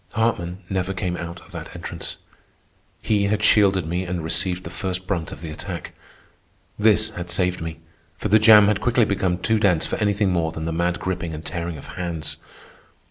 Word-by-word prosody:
Hartman 95 -5 -1
never 95 0 -2
came 90 -1 -2
out 85 0 -6
of - - -17
that - - -8
entrance. - - -6 0.9
He 105 -2 +2
had 105 +1 0
shielded 100 -5 +4
me 90 +3 -1
and 90 -2 -3
received 90 +2 -1
the 80 - -7
first 95 -2 -3
brunt 90 -4 -2
of - - -9
the 80 -2 -6
attack. 75 - -6 0.9
This 110 0 +4
had 90 -4 -6
saved 90 0 +1
me, 80 0 -5 0.4
for 105 - -2
the 110 +2 +6
jam 105 -1 +8
had 105 0 +2
quickly 120 0 +3
become 95 -3 0
too 110 +4 +1
dense 90 -6 +3
for - - -2
anything 105 -2 +1
more 85 -2 +1
than 80 0 -5
the 80 - -2
mad 85 +1 0
gripping 85 -3 -3
and 80 +1 -8
tearing 85 -2 -4
of 70 - -11
hands. 80 -4 -3
90 Hz, 190 wpm, -23 LUFS, 85-105 Hz, 0.9 s, jam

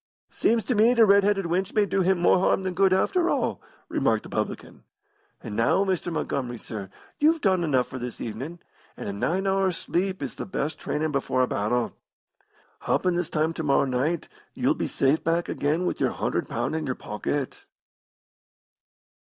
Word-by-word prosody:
"Seems 230 -1 +1
to 250 - +1
me 225 +3 +4
t' 230 - +6
red 200 -1 +6
headed 195 -2 +1
wench 185 +5 -1
may 210 -1 +4
do 195 0 0
him 190 +1 +3
more 175 +1 +4
harm 190 +1 +2
than 185 -1 -2
good, 190 +1 +3
after 345 - +2
all," - - 0 0.3
remarked - - +1
the - - -10
publican. - - -4 0.6
"And 110 -4 -6
now, 115 - +3
Mr. 185 -2 -1
Montgomery, 125 -6 -2
sir, 105 -3 -7 0.3
you've 320 +2 +4
done 190 - +2
enough 130 -6 +2
for 130 - -7
this 125 -1 -6
evenin', 130 +10 -5 0.4
an' - - -6
a 100 - -3
nine 180 - -1
hours' 190 -2 +1
sleep 185 -1 -2
is 135 - -4
the - - -6
best 155 -5 -3
trainin' 155 +1 -2
before 135 -2 +1
a - - +1
battle. 115 +3 -1 0.9
Happen 180 -1 +1
this 175 -2 -1
time 155 +2 0
to 165 - -4
morrow 140 -2 +3
night 140 +6 -1 0.3
you'll - - +2
be - - -3
safe 140 +4 +1
back 165 +1 +1
again 155 +5 0
with - - -2
your - - +2
100 - - -2
pound 155 - -2
in 155 -2 -2
your 130 - -1
pocket." 130 +6 -4
170 Hz, 185 wpm, -26 LUFS, 135-190 Hz, 0.9 s, t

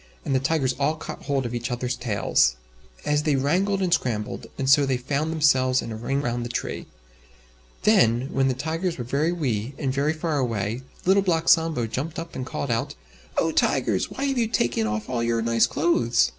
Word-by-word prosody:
And 140 - -1
the 130 - +3
Tigers 135 -1 +1
all 145 +3 +1
caught 160 - -8
hold 135 -3 0
of 120 - -4
each 120 +1 -3
others' 125 0 -2
tails. 100 - +1 0.5
As 150 0 +2
they 150 -1 +1
wrangled 190 +9 +1
and 175 -2 +1
scrambled, 110 -9 -2
and 135 - -2
so 140 +2 +6
they 135 -2 +1
found 140 +5 -2
themselves 130 -5 +3
in 115 - -4
a - - -4
ring 135 +5 -2
around 120 -1 -1
the 120 - -4
tree. - - -4 1.0
Then, 135 - +4
when 135 0 +2
the 130 - 0
Tigers 165 +5 -2
were 125 - -4
very 140 +7 0
wee 130 -7 -2
and 135 -3 -1
very 145 +3 +1
far 155 -2 -1
away, 115 -2 -2 0.2
Little 195 +2 +5
Black 165 -4 0
Sambo 160 -8 +3
jumped 140 +8 -4
up 165 0 -6
and 130 0 -4
called 140 - -3
out, 115 0 -1 0.4
"Oh! 165 - +2
Tigers! 120 -11 +1
why 270 - -5
have 270 -2 0
you 230 - +2
taken 120 - 0
off 105 0 -3
all 125 -2 -2
your 115 -1 0
nice 115 0 +3
clothes? 120 - +2
135 Hz, 205 wpm, -24 LUFS, 120-160 Hz, 1.0 s, so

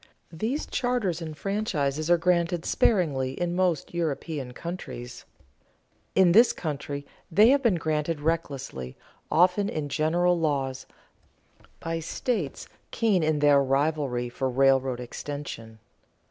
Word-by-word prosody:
These 225 - -2
charters 230 -9 -1
and 155 -2 -6
franchises 155 -7 -1
are 175 - +6
granted 170 0 +1
sparingly 140 - +1
in 175 0 -1
most 180 -4 0
European 155 -5 -3
countries. 125 -5 -7 0.9
In 185 -2 +5
this 230 +7 +6
country 145 -3 -5 0.2
they 210 +6 +6
have 275 +1 +4
been 230 -8 +3
granted 155 -1 -1
recklessly, 140 - -3 0.3
often 180 +4 +3
in 150 -2 -3
general 170 +4 +2
laws, 135 -4 -1 0.9
by 165 0 -3
states 170 - -3 0.2
keen 215 -6 +2
in 155 -1 +1
their 145 -1 +5
rivalry 135 -2 0
for 130 +2 -2
railroad 130 -1 +2
extension. 125 -3 -7
155 Hz, 120 wpm, -26 LUFS, 140-180 Hz, 0.9 s, are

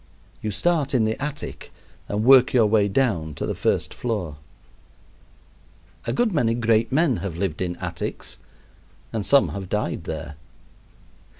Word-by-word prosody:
You 110 - -2
start 140 - +1
in 120 - +3
the 110 +4 -2
attic 150 0 -6 0.4
and 105 +1 -1
work 130 +1 +7
your 120 -3 +5
way 105 -1 +3
down 95 - 0
to - - -3
the - - -2
first - - 0
floor. 100 -11 -3 1.7
A - - +1
good 240 -2 +1
many 115 -7 +2
great 115 -1 +2
men 140 -4 +3
have 95 -5 -5
lived 95 -3 -2
in 90 -1 -1
attics - - -5 0.7
and 110 -2 -1
some 140 +8 +5
have 95 -2 -6
died 105 -5 -2
there. 75 -1 -6
110 Hz, 145 wpm, -24 LUFS, 95-130 Hz, 1.7 s, work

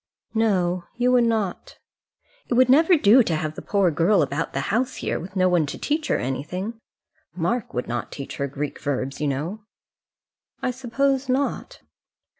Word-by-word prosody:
"No; 185 -6 +1
you 245 +1 +2
would 245 -1 +4
not." 220 -5 -2 0.7
"It 240 - 0
would 255 +1 +5
never 320 +6 +6
do 245 -1 +6
to 170 -8 0
have 155 0 -2
the - - -8
poor 195 -4 +2
girl 170 +3 +3
about 145 +4 -2
the - - -2
house 250 +3 0
here, - - -2
with 185 +4 -9
no 185 -1 +3
one 175 -4 +2
to - - -5
teach 305 +1 -1
her - - +2
anything. 180 - -4 0.6
Mark 185 +7 -2
would 125 - -2
not 120 0 -4
teach 140 - -7
her 140 - -1
Greek 140 +1 -5
verbs, 135 0 -3
you 150 - +1
know." 155 +10 -3 1.0
"I 255 - -1
suppose 265 +2 -1
not." 270 +2 -1
190 Hz, 175 wpm, -24 LUFS, 155-245 Hz, 1.0 s, never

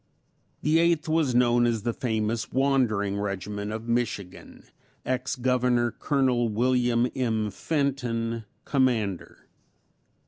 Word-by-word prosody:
The 155 +2 +3
Eighth 170 -2 +2
was 155 -5 +1
known 120 -1 +4
as 115 -3 -1
the 120 - -1
famous 110 -1 -2
"wandering" 120 -7 +1
regiment 100 +1 -4
of 110 +1 -6
Michigan 115 -6 -3 0.4
ex 130 +1 -1
Governor 125 -1 +1
Col. 130 -4 +1
William 120 +1 +2
M. 110 -5 0
Fenton, 120 -7 -2 0.2
Commander. 115 - -1
120 Hz, 105 wpm, -26 LUFS, 110-130 Hz, 0.4 s, known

